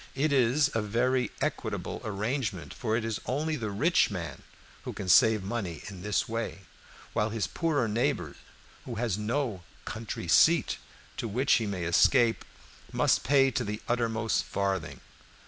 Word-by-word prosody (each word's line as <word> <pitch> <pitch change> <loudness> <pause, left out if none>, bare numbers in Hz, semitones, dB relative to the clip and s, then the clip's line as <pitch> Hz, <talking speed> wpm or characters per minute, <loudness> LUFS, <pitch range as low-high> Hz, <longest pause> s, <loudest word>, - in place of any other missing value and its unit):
It 145 +2 +1
is 135 +3 +3
a 115 - +1
very 125 +3 +1
equitable - - -3
arrangement, 105 - -3
for 115 -4 -1
it 115 - -2
is 115 -2 -3
only 155 +5 0
the 110 -6 -3
rich 145 - +3
man 90 -5 -5 0.4
who - - -6
can 95 - -6
save 110 +3 +5
money 95 -5 -4
in 95 -3 -9
this 105 +2 0
way, 115 -3 -4 0.5
while 105 - +1
his 110 -1 -1
poorer 155 -8 0
neighbor, 110 - 0 0.5
who 120 - -5
has 110 -3 0
no 110 -1 -2 0.2
country 110 +1 -5
seat - - +4 0.4
to - - -3
which 125 +6 +2
he 110 - -2
may 95 -3 -3
escape, 115 +7 +4 0.5
must - - +2
pay 135 +1 +4
to - - -1
the 105 +1 -4
uttermost 115 -2 0
farthing. 95 -4 -2
115 Hz, 155 wpm, -29 LUFS, 100-130 Hz, 0.5 s, save